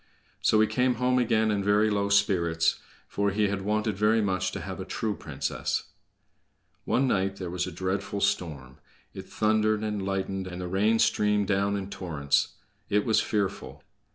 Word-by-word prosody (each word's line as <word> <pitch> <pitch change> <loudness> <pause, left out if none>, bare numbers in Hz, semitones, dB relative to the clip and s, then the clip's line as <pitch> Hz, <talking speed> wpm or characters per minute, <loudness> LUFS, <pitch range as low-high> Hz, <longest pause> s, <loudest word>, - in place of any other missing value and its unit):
So 110 - +3
he 110 - +6
came 125 +2 +1
home 125 +1 +2
again 110 -2 +2
in 100 -1 0
very 105 +2 +3
low 100 -1 0
spirits, 90 -5 +2 0.3
for 100 0 0
he 105 +1 +1
had 100 -1 -2
wanted 105 +1 0
very 105 +2 +3
much 95 -3 0
to - - -4
have 95 -1 -6
a - - -3
true 105 +3 -2
princess. 70 -2 -3 0.9
One 130 +2 +2
night 95 -4 0
there 90 -3 -6
was 90 0 -2
a - - -5
dreadful 95 +3 -3
storm; 75 -10 -2 0.3
it - - -9
thundered 110 0 +1
and 105 -2 -2
lightened 95 0 -2
and 90 -1 -7
the 90 - -4
rain 105 +5 +2
streamed 105 -2 +2
down 100 0 +1
in 100 0 -6
torrents. 80 -8 -1 0.4
It 105 0 +2
was 110 - +3
fearful! 100 -3 -3
100 Hz, 175 wpm, -27 LUFS, 95-105 Hz, 0.9 s, he